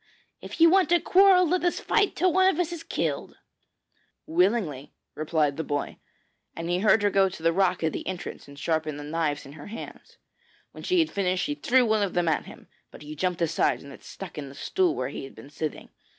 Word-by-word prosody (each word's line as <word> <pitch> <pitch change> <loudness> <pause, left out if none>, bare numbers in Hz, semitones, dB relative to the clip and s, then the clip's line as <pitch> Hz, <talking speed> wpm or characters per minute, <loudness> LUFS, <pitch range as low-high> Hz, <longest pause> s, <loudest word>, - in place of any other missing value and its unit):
if - - -9
you 335 - +8
want 370 +2 +4
to 345 0 +4
quarrel 370 0 +5
let 360 +3 0
us 350 - +1
fight 415 -2 +1
till 365 -1 +2
one 375 +1 +4
of 360 - -1
us 350 -1 0
is 335 - -6
killed.' - - -3 0.9
'Willingly!' 170 - 0 0.2
replied 155 -2 0
the 160 - -2
boy, 145 -1 -3 0.6
and 165 +1 -4
he 175 - +1
heard 210 +1 +4
her 205 - +3
go 195 -1 +3
to 160 - -11
the 165 0 +3
rock 185 -1 +1
at 160 - 0
the - - -5
entrance 180 -4 -6
and 140 0 -13
sharpen 155 0 -1
the 145 - -7
knives 150 -1 -2
in 135 - -11
her 145 -1 -11
hands. 225 +2 -10 0.5
When - - -11
she 365 - +1
had 325 -2 +2
finished 185 -2 0
she 295 - -1
threw 260 -3 +2
one 220 -1 +2
of 200 -3 -1
them 175 -1 +1
at 160 - +1
him, - - -13 0.2
but - - -13
he 150 +1 -8
jumped 180 +2 -1
aside 150 -5 0
and 140 0 -11
it - - -15
stuck 185 -5 -9
in 140 -2 -7
the 135 - -13
stool 365 - 0
where 130 - -3
he 145 - -7
had 135 - -11
been 140 - -13
sitting. 155 +1 -5
180 Hz, 230 wpm, -26 LUFS, -, 0.9 s, you